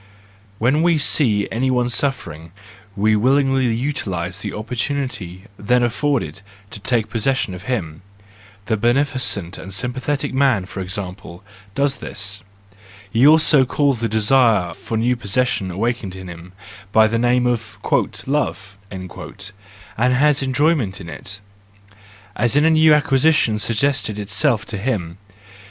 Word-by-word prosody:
When 130 Hz, +8 st, +2 dB
we 170 Hz, -1 st, +3 dB
see 115 Hz, -8 st, +2 dB
any 130 Hz, +3 st, 0 dB
one 125 Hz, -1 st, +1 dB
suffering, 115 Hz, -, -2 dB, 0.4 s
we 110 Hz, +1 st, +2 dB
willingly 135 Hz, +3 st, +2 dB
utilise 100 Hz, -8 st, -3 dB
the -, -, -4 dB
opportunity 110 Hz, -5 st, -4 dB, 0.2 s
then 125 Hz, +4 st, +2 dB
afforded 120 Hz, -, -1 dB, 0.3 s
to 105 Hz, -, -8 dB
take 115 Hz, 0 st, 0 dB
posses¬ 120 Hz, +4 st, +1 dB
sion 100 Hz, -7 st, -2 dB
of 90 Hz, +2 st, -9 dB
him; 85 Hz, -11 st, -3 dB, 0.6 s
the 110 Hz, 0 st, 0 dB
beneficent 120 Hz, -6 st, 0 dB
and 95 Hz, -, -9 dB
sympathetic 130 Hz, +8 st, -2 dB
man, 130 Hz, -8 st, +2 dB
for 95 Hz, +1 st, -8 dB
example, 95 Hz, -2 st, -6 dB, 0.3 s
does 140 Hz, -1 st, +1 dB
this; 100 Hz, -1 st, -4 dB, 0.7 s
he 120 Hz, +7 st, +4 dB
also 155 Hz, -2 st, +6 dB
calls 140 Hz, -1 st, 0 dB
the 115 Hz, 0 st, -1 dB
desire 110 Hz, -5 st, +3 dB
for 110 Hz, -, -5 dB
new 120 Hz, +3 st, +1 dB
possession 120 Hz, -2 st, -1 dB
awakened 105 Hz, 0 st, -3 dB
in 95 Hz, 0 st, -9 dB
him, 85 Hz, +1 st, -11 dB, 0.4 s
by 110 Hz, +1 st, +5 dB
the 115 Hz, +1 st, 0 dB
name 125 Hz, +1 st, +2 dB
of 115 Hz, -5 st, -2 dB, 0.5 s
"love," 100 Hz, -9 st, -2 dB
and 100 Hz, +4 st, -5 dB
has 145 Hz, +2 st, +3 dB
enjoyment 130 Hz, -, 0 dB
in 85 Hz, -, -9 dB
it, 100 Hz, +4 st, -8 dB, 0.9 s
as 120 Hz, +4 st, +1 dB
in 150 Hz, +1 st, +4 dB
a 160 Hz, -, +5 dB
new 160 Hz, 0 st, +5 dB
acquisition 145 Hz, -6 st, +3 dB
suggesting 115 Hz, -1 st, 0 dB
itself 105 Hz, +2 st, 0 dB
to 105 Hz, -, -5 dB
him. 95 Hz, -7 st, -3 dB
115 Hz, 135 wpm, -20 LUFS, 100-135 Hz, 0.9 s, also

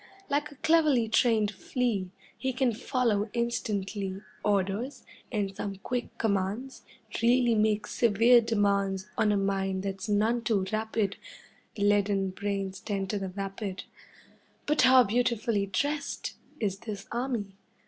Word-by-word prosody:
Like 295 Hz, +1 st, 0 dB
a -, -, -13 dB
cleverly 305 Hz, -6 st, +3 dB
trained 220 Hz, -2 st, +3 dB
flea, 215 Hz, -3 st, -1 dB, 0.3 s
He 260 Hz, -1 st, -2 dB
can 255 Hz, -2 st, +1 dB
follow 225 Hz, -3 st, 0 dB
instantly 205 Hz, -4 st, -2 dB, 0.2 s
Orders, 205 Hz, +6 st, -1 dB, 0.3 s
and 200 Hz, -4 st, -1 dB
some 200 Hz, 0 st, -4 dB
quick 245 Hz, +5 st, -4 dB
commands 210 Hz, +5 st, -1 dB, 0.4 s
Really 240 Hz, 0 st, +4 dB
make 215 Hz, -1 st, +2 dB
severe 235 Hz, +2 st, +5 dB
demands 200 Hz, -4 st, +1 dB
On 215 Hz, -1 st, +2 dB
a 205 Hz, -, +2 dB
mind 195 Hz, -1 st, 0 dB
that's 195 Hz, +2 st, -4 dB
none 220 Hz, +3 st, +2 dB
too 210 Hz, -4 st, +1 dB
rapid, 215 Hz, -2 st, -1 dB, 0.6 s
Leaden 200 Hz, -1 st, +2 dB
brains 195 Hz, -1 st, -3 dB
tend 195 Hz, -2 st, -3 dB
to 205 Hz, -, -1 dB
the 190 Hz, -1 st, -4 dB
vapid. 195 Hz, 0 st, -5 dB, 0.8 s
But 300 Hz, +1 st, +2 dB
how 255 Hz, 0 st, +7 dB
beautifully 230 Hz, -2 st, +1 dB
dressed 285 Hz, +10 st, -2 dB, 0.3 s
Is 200 Hz, -3 st, -1 dB
this 210 Hz, -3 st, -6 dB
army! 235 Hz, -5 st, -2 dB
210 Hz, 130 wpm, -29 LUFS, 195-240 Hz, 0.8 s, how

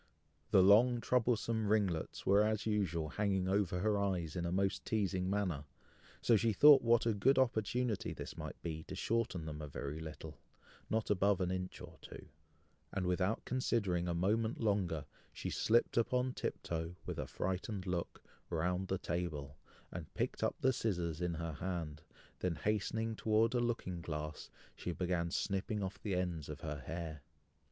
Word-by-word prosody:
The 95 Hz, -2 st, +6 dB
long 120 Hz, +5 st, +6 dB
troublesome 115 Hz, -2 st, +1 dB
ringlets 100 Hz, -6 st, 0 dB
were 100 Hz, +2 st, +5 dB
as 110 Hz, 0 st, +1 dB
usual 90 Hz, -7 st, 0 dB
hanging 95 Hz, 0 st, 0 dB
over 95 Hz, -2 st, +1 dB
her 105 Hz, 0 st, +2 dB
eyes 90 Hz, -6 st, -1 dB
in 85 Hz, -1 st, -1 dB
a -, -, -2 dB
most 95 Hz, +1 st, 0 dB
teazing 95 Hz, -4 st, 0 dB
manner, 95 Hz, -8 st, -1 dB, 0.6 s
so 115 Hz, -, +5 dB
she 110 Hz, +1 st, +3 dB
thought 145 Hz, +6 st, +9 dB
what 120 Hz, -1 st, +4 dB
a 115 Hz, -, +3 dB
good 120 Hz, +7 st, +3 dB
opportunity 120 Hz, -2 st, +1 dB
this -, -, -7 dB
might -, -, -7 dB
be 80 Hz, -2 st, -3 dB
to -, -, -6 dB
shorten 115 Hz, -8 st, -1 dB
them 75 Hz, -1 st, -5 dB
a 75 Hz, -, -5 dB
very 70 Hz, +2 st, -5 dB
little, 80 Hz, -1 st, -8 dB, 0.5 s
not 110 Hz, -1 st, 0 dB
above 100 Hz, 0 st, +3 dB
an 90 Hz, -1 st, 0 dB
inch 95 Hz, 0 st, -4 dB
or -, -, -11 dB
two; -, -, -11 dB, 0.6 s
and 95 Hz, -2 st, -2 dB
without 90 Hz, +4 st, 0 dB
considering 105 Hz, -9 st, 0 dB
a 85 Hz, -, 0 dB
moment 110 Hz, +6 st, +1 dB
longer, 95 Hz, -9 st, 0 dB, 0.3 s
she -, -, -5 dB
slipped 115 Hz, +1 st, +2 dB
upon 125 Hz, +2 st, +2 dB
tiptoe, 85 Hz, -5 st, -3 dB
with -, -, -4 dB
a -, -, -3 dB
frightened 95 Hz, +1 st, -3 dB
look, 90 Hz, -2 st, -3 dB, 0.3 s
round 90 Hz, +3 st, 0 dB
the 95 Hz, -, 0 dB
table, 80 Hz, -6 st, -3 dB, 0.4 s
and -, -, -7 dB
picked -, -, -1 dB
up -, -, +1 dB
the 130 Hz, 0 st, +4 dB
scissors 90 Hz, -8 st, -1 dB
in 90 Hz, -1 st, 0 dB
her 85 Hz, 0 st, -3 dB
hand, 80 Hz, -3 st, -4 dB, 0.4 s
then 90 Hz, -2 st, 0 dB
hastening 110 Hz, +3 st, -1 dB
towards 110 Hz, +2 st, +2 dB
a 125 Hz, -, +2 dB
looking 115 Hz, -7 st, -2 dB
glass, 75 Hz, -1 st, -5 dB, 0.3 s
she 90 Hz, -, -4 dB
began 85 Hz, -1 st, -1 dB
snipping 100 Hz, +3 st, -1 dB
off 95 Hz, 0 st, -5 dB
the 100 Hz, -4 st, -1 dB
ends 85 Hz, -5 st, -2 dB
of 75 Hz, +1 st, -6 dB
her 75 Hz, -3 st, -4 dB
hair. 80 Hz, -2 st, -5 dB
95 Hz, 170 wpm, -35 LUFS, 85-110 Hz, 0.6 s, thought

